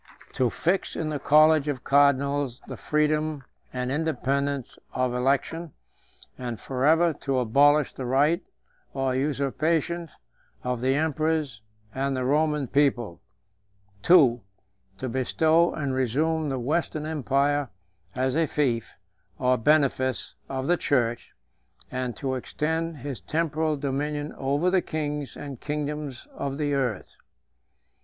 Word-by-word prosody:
To 125 Hz, -2 st, +1 dB
fix 180 Hz, -, -1 dB
in 155 Hz, -, -2 dB
the 150 Hz, -2 st, -2 dB
college 155 Hz, +1 st, +5 dB
of 135 Hz, -4 st, -3 dB
cardinals 140 Hz, -2 st, +2 dB
the -, -, -6 dB
freedom 150 Hz, -1 st, 0 dB, 0.3 s
and 125 Hz, 0 st, -3 dB
independence 140 Hz, -3 st, -1 dB
of 130 Hz, -1 st, 0 dB
election, 140 Hz, +5 st, 0 dB, 0.7 s
and 120 Hz, -3 st, -4 dB
forever 155 Hz, +6 st, +2 dB
to 135 Hz, -2 st, 0 dB
abolish 140 Hz, +4 st, +4 dB
the 130 Hz, -, -5 dB
right 145 Hz, +6 st, +3 dB, 0.5 s
or 135 Hz, -1 st, 0 dB
usurpation 155 Hz, +5 st, 0 dB, 0.5 s
of 125 Hz, -1 st, -2 dB
the 130 Hz, +1 st, +2 dB
emperors 155 Hz, -5 st, 0 dB, 0.3 s
and 135 Hz, 0 st, -1 dB
the 130 Hz, -, -1 dB
Roman 150 Hz, +1 st, +2 dB
people. 125 Hz, -9 st, +1 dB, 0.9 s
II. 135 Hz, -10 st, +6 dB, 0.6 s
To 130 Hz, -, -4 dB
bestow 160 Hz, +7 st, +2 dB
and 140 Hz, -4 st, -2 dB
resume 150 Hz, +5 st, 0 dB
the 135 Hz, -, -2 dB
Western 150 Hz, +4 st, -1 dB
empire 145 Hz, -2 st, 0 dB, 0.5 s
as 130 Hz, +1 st, 0 dB
a 165 Hz, 0 st, +2 dB
fief 125 Hz, -8 st, -1 dB, 0.4 s
or 130 Hz, 0 st, +2 dB
benefice 130 Hz, 0 st, +1 dB
134 135 Hz, -, -4 dB
of 130 Hz, -, -2 dB
the 175 Hz, +3 st, +3 dB
church, 120 Hz, -6 st, 0 dB, 0.6 s
and 125 Hz, -1 st, -3 dB
to 135 Hz, -2 st, -2 dB
extend 160 Hz, +5 st, -2 dB
his 135 Hz, -5 st, -6 dB
temporal 155 Hz, -, -1 dB
dominion 145 Hz, +2 st, -2 dB
over 145 Hz, +6 st, 0 dB
the 185 Hz, -1 st, +3 dB
kings 150 Hz, -3 st, -4 dB
and 140 Hz, -4 st, -8 dB
kingdoms 150 Hz, -3 st, -4 dB
of 140 Hz, -1 st, -4 dB
the 145 Hz, -1 st, 0 dB
earth. 125 Hz, -7 st, -2 dB
140 Hz, 125 wpm, -26 LUFS, 130-155 Hz, 0.9 s, II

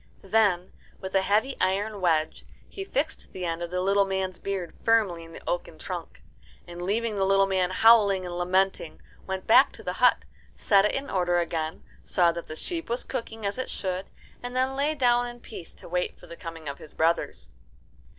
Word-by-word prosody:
Then 195 Hz, -3 st, +2 dB, 0.3 s
with 190 Hz, 0 st, -7 dB
a 195 Hz, -, +4 dB
heavy 215 Hz, +8 st, +1 dB
iron 200 Hz, +2 st, 0 dB
wedge 160 Hz, -3 st, +1 dB, 0.2 s
he 390 Hz, -, -6 dB
fixed 315 Hz, -4 st, -3 dB
the 185 Hz, -1 st, -4 dB
end 165 Hz, 0 st, -2 dB
of 170 Hz, -, -3 dB
the 180 Hz, +1 st, -1 dB
little 200 Hz, +2 st, +3 dB
man's 190 Hz, -1 st, -2 dB
beard 195 Hz, -4 st, -4 dB
firmly 210 Hz, -7 st, +2 dB
in 165 Hz, -, -13 dB
the -, -, -12 dB
oaken -, -, -3 dB
trunk, -, -, -7 dB, 0.4 s
and, 175 Hz, 0 st, -8 dB
leaving 215 Hz, +3 st, -1 dB
the 195 Hz, -, +2 dB
little 195 Hz, 0 st, +4 dB
man 190 Hz, -2 st, +1 dB
howling 200 Hz, -2 st, +5 dB
and 175 Hz, -1 st, -5 dB
lamenting, 180 Hz, -1 st, 0 dB, 0.3 s
went 190 Hz, -1 st, -4 dB
back 255 Hz, +5 st, +6 dB
to -, -, -13 dB
the -, -, -2 dB
hut, -, -, +5 dB, 0.3 s
set 200 Hz, -1 st, +4 dB
it 210 Hz, -, +1 dB
in 275 Hz, +1 st, -3 dB
order 175 Hz, -2 st, +1 dB
again, 160 Hz, -2 st, -2 dB, 0.2 s
saw 175 Hz, -2 st, +3 dB
that 170 Hz, 0 st, -7 dB
the 155 Hz, -, -7 dB
sheep 330 Hz, -, -4 dB
was 240 Hz, +2 st, -1 dB
cooking 225 Hz, -2 st, -5 dB
as 200 Hz, +5 st, 0 dB
it 255 Hz, -, -3 dB
should, 185 Hz, -1 st, -3 dB, 0.3 s
and 245 Hz, 0 st, -6 dB
then 260 Hz, +1 st, +1 dB
lay 290 Hz, +3 st, +1 dB
down 245 Hz, -3 st, +3 dB
in 240 Hz, 0 st, -8 dB
peace 200 Hz, -8 st, -10 dB
to -, -, -13 dB
wait 180 Hz, +1 st, -2 dB
for -, -, -14 dB
the 170 Hz, -, -10 dB
coming 165 Hz, -2 st, -8 dB
of 140 Hz, 0 st, -5 dB
his 150 Hz, -, -13 dB
brothers. 160 Hz, -, 0 dB
190 Hz, 200 wpm, -27 LUFS, 175-225 Hz, 0.4 s, back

